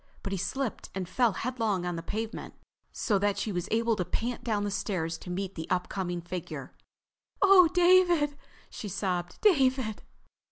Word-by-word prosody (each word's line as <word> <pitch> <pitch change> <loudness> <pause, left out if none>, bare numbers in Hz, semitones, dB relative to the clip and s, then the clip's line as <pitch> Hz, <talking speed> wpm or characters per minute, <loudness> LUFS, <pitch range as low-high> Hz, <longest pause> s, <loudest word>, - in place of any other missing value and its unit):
But 195 - -4
he 195 - -1
slipped 250 +6 -3
and 190 -2 -3
fell 235 +3 +2
headlong 225 -6 -1
on 175 -1 -2
the 165 - -4
pavement, 220 +6 -5 0.4
so 205 -5 0
that 205 0 +1
she 215 - -2
was 175 -2 -2
able 230 0 +2
to 180 - 0
pant 235 +7 -3
down 215 -3 0
the 205 - -2
stairs 175 -5 -2
to - - -10
meet 190 +1 -3
the 160 -3 -6
upcoming 180 -1 -1
figure. 175 0 -6 0.7
"Oh, 390 -3 +8
David," 350 -4 +4 0.4
she 210 - -6
sobbed, 180 -2 -2
"David!" 260 - +3
205 Hz, 165 wpm, -29 LUFS, 180-255 Hz, 0.7 s, Oh